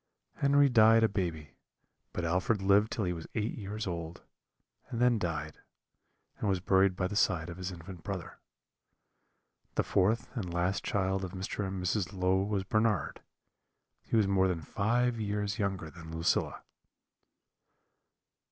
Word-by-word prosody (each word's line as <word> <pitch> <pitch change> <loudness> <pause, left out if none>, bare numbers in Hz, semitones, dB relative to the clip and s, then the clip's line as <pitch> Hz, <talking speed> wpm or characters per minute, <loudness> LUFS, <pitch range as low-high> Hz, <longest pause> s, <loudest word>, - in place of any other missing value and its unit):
Henry 140 0 +5
died 115 -2 +6
a - - +6
baby, 85 -8 -3 0.6
but 90 - -3
Alfred 95 +6 +1
lived 100 +3 +4
till 115 - -1
he 90 - 0
was 80 -2 -7
eight 110 0 -1
years 105 0 -5
old, 85 -2 -5 0.7
and 115 - -4
then 120 -2 +4
died, 80 -4 -3 0.8
and 105 - 0
was 95 -2 +1
buried 95 0 +3
by 90 - -1
the 105 - -5
side 90 -6 +1
of 85 - -9
his 95 0 -4
infant 85 0 -10
brother. 95 -4 -6 1.4
The - - +2
fourth 110 +5 +1
and 95 -8 -3
last 90 +3 0
child 95 -1 0
of 95 -1 -5
Mr. 95 +1 -3
and 95 0 -4
Mrs. 95 +1 -1
Low 95 0 +2
was 100 -1 -1
Bernard; 110 0 0 0.8
he - - -3
was 110 -3 +4
more 95 -1 +3
than 90 -3 -1
five 115 +8 0
years 105 +1 -2
younger 95 -6 -2
than 80 -1 -11
Lucilla. 80 0 0
95 Hz, 150 wpm, -31 LUFS, 90-110 Hz, 1.4 s, died